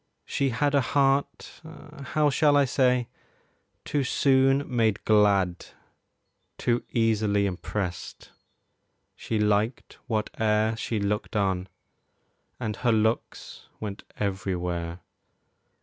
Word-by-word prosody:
She 140 -1 0
had 145 +4 0
A 140 - +4
heart 135 +1 0 0.5
how 150 -1 +3
shall 145 +1 +4
I 140 - +4
say 125 -2 +2 0.8
too 145 -2 0
soon 135 +1 +3
made 115 -5 0
glad, 100 -4 +3 0.9
Too 120 0 0
easily 110 -3 +1
impressed; 90 -1 -5 0.8
she 115 - -3
liked 105 +3 0
whate'er 110 0 0
She 110 -1 -3
looked 105 +2 -2
on, 95 -2 0 0.9
and 110 -4 -3
her 120 -2 +1
looks 110 +1 -1
went 105 -1 -6 0.2
everywhere. 90 -3 -3
110 Hz, 100 wpm, -26 LUFS, 100-130 Hz, 0.9 s, A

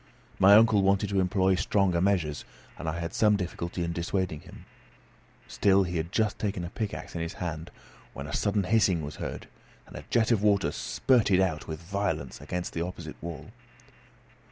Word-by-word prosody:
My 100 +2 +8
uncle 110 -1 +6
wanted 100 +1 +2
to 100 - +2
employ 95 0 +2
stronger 95 -2 +1
measures, 90 -7 0 0.4
and 80 - -3
I 85 +2 -3
had 85 0 -4
some 105 -1 +4
difficulty 90 -2 -4
in 85 0 -2
dissuading 85 -2 -2
him; - - -14 0.8
still 100 -1 +3
he 90 -1 -3
had 80 +2 -3
just 110 0 0
taken 100 -4 -2
a 85 - -7
pickaxe 105 -1 -5
in 85 - -4
his 85 0 -4
hand, 80 -2 -5 0.4
when 70 - -7
a 75 - -7
sudden 100 -1 +1
hissing 95 -4 +2
was 75 +1 -7
heard, - - -5 0.4
and - - -14
a - - -7
jet 115 0 +2
of 110 -4 +3
water 105 -2 +2
spurted 110 -8 +2
out 90 -5 0
with 80 +1 -6
violence 100 +4 -3
against 90 0 -4
the 85 - -2
opposite 85 -3 -6
wall. 85 +5 -7
95 Hz, 180 wpm, -28 LUFS, 85-100 Hz, 0.8 s, My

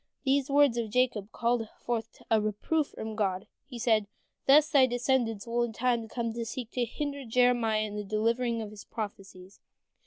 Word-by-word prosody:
" - - -51
These 275 0 +2
words 280 -3 +4
of 230 -2 -1
Jacob 225 -3 0
called 235 -2 0
forth 230 -2 -4
a 220 -1 +4
reproof 215 +9 0
from 220 0 -7
God. 195 -3 -1 0.2
He 250 - -8
said, 220 -3 +2 0.4
"Thus 295 +2 +7
thy 265 -3 +5
descendants 245 -4 0
will 235 +1 0
in 240 -2 -1
time 240 0 +1
to 225 - -8
come 230 -2 -1
seek 235 +1 -5
to 245 -1 0
hinder 280 +4 -4
Jeremiah 240 -2 +2
in 210 -1 -4
delivering 230 +3 0
his 210 -1 -11
prophecies." 195 -3 -8
230 Hz, 175 wpm, -29 LUFS, 215-250 Hz, 0.4 s, Thus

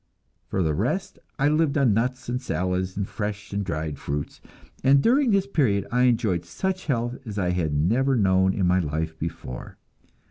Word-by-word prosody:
For 95 - 0
the 80 -2 +1
rest - - -2 0.2
I 140 - +2
lived 155 0 +2
on 130 -6 +4
nuts 125 +4 -1
and 125 +1 -2
salads 95 -5 -2
and 100 -1 -1
fresh 105 -1 -5
and 100 0 -1
dried 80 -5 -3
fruits; 70 0 -4 0.4
and 135 +1 +6
during 255 - +3
this 195 -2 +3
period 120 - +1
I 125 +1 +3
enjoyed 110 -8 +2
such 185 - -3
health 120 -3 -1
as 105 -4 -7
I 90 -3 +1
had 85 -4 0
never 120 - +2
known 95 -3 +3
in 95 - +1
my 90 +1 +3
life 80 0 -2
before. 80 -6 -6
100 Hz, 180 wpm, -25 LUFS, 90-130 Hz, 0.4 s, and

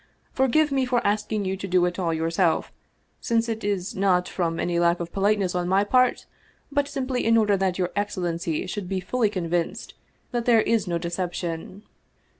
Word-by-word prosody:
" - - -40
Forgive 275 +4 +2
me 270 -1 +2
for 250 -1 0
asking 210 0 0
you 190 0 -1
to 195 0 -6
do 180 -1 +3
it 180 +1 -2
all 170 -3 0
yourself, 165 +1 0 0.5
since 230 -1 0
it 225 -1 -3
is 200 -2 -2
not 185 -2 +2
from 165 -3 -2
any 175 -1 0
lack 170 0 +3
of 170 -1 -5
politeness 200 -2 +1
on 180 -1 -1
my 190 +2 +3
part, 255 +4 +2 0.5
but 285 0 +1
simply 265 -3 -2
in 230 0 +4
order 210 -2 +3
that 190 -2 0
your 180 -1 -1
excellency 175 -5 -2
should 185 0 -5
be 190 -1 -1
fully 215 +4 0
convinced 175 -4 -2 0.4
that 240 -2 -2
there 230 -2 +5
is 225 -3 +1
no 170 -1 0
deception." 175 +2 -4
195 Hz, 190 wpm, -25 LUFS, 175-225 Hz, 0.5 s, there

